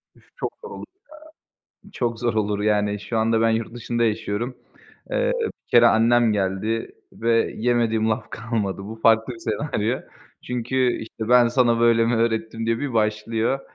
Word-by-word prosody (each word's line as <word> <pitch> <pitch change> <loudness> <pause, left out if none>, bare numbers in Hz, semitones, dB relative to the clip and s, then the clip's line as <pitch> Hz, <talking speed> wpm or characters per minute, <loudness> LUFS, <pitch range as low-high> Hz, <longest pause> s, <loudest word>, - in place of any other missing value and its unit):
Üf, - - -23
çok - - -4
zor 460 - -9
olur - - -8 1.0
ya. - - -17
Çok 115 -2 -2
zor 120 -1 0
olur, 105 -2 0
yani. 105 -1 +1
Şu 110 +3 -4
anda 110 0 +2
ben 115 - +4
yurt 115 0 -1
dışında 120 0 -2
yaşıyorum. 115 +2 -2 0.5
Eee, - - +1 0.3
bir - - -68
kere 120 0 +6
annem 115 0 +4
geldi 105 +3 -2 0.2
ve 115 0 +1
yemediğim 115 -2 +1
laf 110 0 -2
kalmadı. 115 -4 -3
Bu 110 +3 -7
farklı 110 +2 +3
bir 115 - -12
senaryo. 115 0 -2 0.4
Çünkü, 125 +1 0
işte, 110 0 -7
"Ben 125 -1 +6
sana 120 -1 +2
böyle 115 -1 +4
mi 120 +1 +1
öğrettim?" 115 0 -1
diye 115 0 0
bir 140 -3 -3
başlıyor. 110 +3 0
115 Hz, 165 wpm, -23 LUFS, 110-120 Hz, 1.0 s, kere